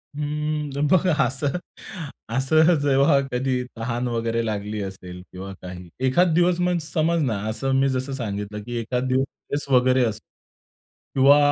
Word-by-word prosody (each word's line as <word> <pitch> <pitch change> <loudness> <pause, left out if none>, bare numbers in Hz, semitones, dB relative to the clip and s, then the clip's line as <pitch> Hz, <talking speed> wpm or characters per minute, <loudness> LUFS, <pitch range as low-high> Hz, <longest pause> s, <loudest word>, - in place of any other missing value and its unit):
हं. 150 -1 -2
बघा 185 -1 +4
असं, 140 +5 -1 0.8
असं 155 +6 +4
जेव्हा 140 0 +4
कधी 125 0 0
तहान 120 +2 -2
वगैरे 115 -1 -1
लागली 105 -1 -3
असेल 90 -2 -8
किंवा 95 +1 -7
काही 90 -1 -9 0.2
एखादं 175 +6 +3
दिवस 175 +1 +3
म्हणजे 180 -3 0
समज 165 +1 +1
ना 115 -6 0
असं 135 +5 -2
मी 135 0 +3
जसं 130 +1 -2
सांगितलं 105 -3 -4
की 120 +1 -6
एखादं 125 +3 -2
दिवस 130 +1 +2
स्ट्रेस 145 +1 -6
वगैरे 130 +1 +4
असतो. 110 -1 -4 0.9
किंवा 140 +2 +7
130 Hz, 145 wpm, -23 LUFS, 115-150 Hz, 0.9 s, किंवा